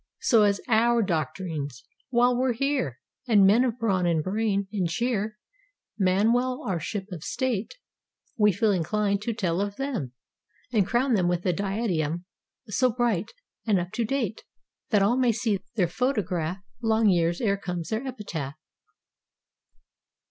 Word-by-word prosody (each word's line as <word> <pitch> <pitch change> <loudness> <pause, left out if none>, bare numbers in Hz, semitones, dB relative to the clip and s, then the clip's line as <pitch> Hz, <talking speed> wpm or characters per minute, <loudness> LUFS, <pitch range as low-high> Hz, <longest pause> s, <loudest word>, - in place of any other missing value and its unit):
So 230 -4 +4
as 200 -1 +3
our 235 0 +3
doctrine's^—"While 165 - -1
we're 255 0 +1
here" 260 - -1 0.3
And 210 -5 +6
men 215 +6 +5
of 245 -2 -1
brawn 195 -6 +1
and 165 -3 +1
brain 200 0 0
and 185 -5 0
cheer 215 +2 -1 0.6
Man 200 +3 +3
well 255 +3 0
our 185 -4 -1
Ship 190 +4 -4
of 170 -3 -6
State; 255 - -2 0.6
We 210 -2 +4
feel 205 +3 +2
inclined 200 +3 0
to 230 +2 -2
tell 185 -4 0
of 200 0 -2
them 240 - -3 0.6
And 205 -5 +3
crown 250 +2 +2
them 185 -5 +2
with 175 0 -1
a 180 - +2
diadem 180 -4 -1 0.4
So 250 +5 +2
bright, 230 -6 0 0.4
and 210 -3 +4
up 175 +1 -4
to 235 - -1
date. 230 -3 -2 0.5
That 210 -4 +4
all 235 +5 +3
may 250 -2 +4
see 220 -3 0 0.2
their 185 -6 +2
photograph 185 - -1 0.2
Long 225 -1 +3
years 170 -3 +2
'ere 200 -4 +1
comes 180 -4 -5
their 220 +3 -1
epitaph. 165 - -5
205 Hz, 150 wpm, -26 LUFS, 180-235 Hz, 0.6 s, And